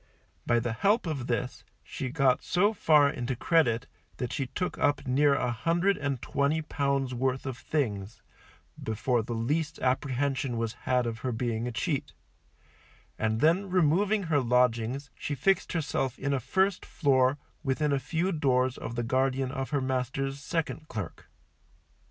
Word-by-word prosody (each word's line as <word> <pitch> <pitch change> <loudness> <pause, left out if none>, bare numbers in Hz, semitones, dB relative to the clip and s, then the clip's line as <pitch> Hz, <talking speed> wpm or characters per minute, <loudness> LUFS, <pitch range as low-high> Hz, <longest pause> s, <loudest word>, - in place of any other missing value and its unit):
By 120 - +4
the 115 -1 -2
help 205 - +2
of 140 -7 -3
this 125 +2 -2 0.2
she 130 - -5
got 135 -2 +2
so 200 +6 +2
far 150 -7 +5
into 125 -2 -2
credit 125 -5 +2 0.3
that 125 -2 -3
she 135 -3 -2
took 180 +8 -3
up 145 -1 +1
near 140 +2 +3
a 125 -2 0
hundred 170 - +1
and 140 -3 -2
twenty 145 +3 0
pounds 140 -4 -1
worth 130 +2 -1
of 130 -2 -3
things 110 -8 -3 0.6
before 115 +2 0
the 115 +2 -4
least 150 +8 -1
apprehension 130 -1 0
was 115 -1 -1 0.2
had 125 -1 +3
of 115 -1 -3
her 130 - -2
being 115 0 -2
a - - -2
cheat; 115 - -2 1.1
and 110 +1 0
then 180 +6 +3
removing 190 +4 +2
her 160 -4 +2
lodgings, 125 +1 +1
she 145 - -3
fixed 190 +8 +1
herself 135 -6 -1
in 140 +1 -1
a 135 - +1
first 190 - +1
floor 130 -3 +2 0.2
within 145 0 0
a 140 - +2
few 170 +6 -1
doors 130 -5 +1
of 115 - -5
the 120 - -1
guardian 130 +2 +1
of 135 -1 -3
her 145 -2 0
master's 130 +1 -2
second 155 +1 -3
clerk. 105 - -6
135 Hz, 160 wpm, -29 LUFS, 125-150 Hz, 1.1 s, far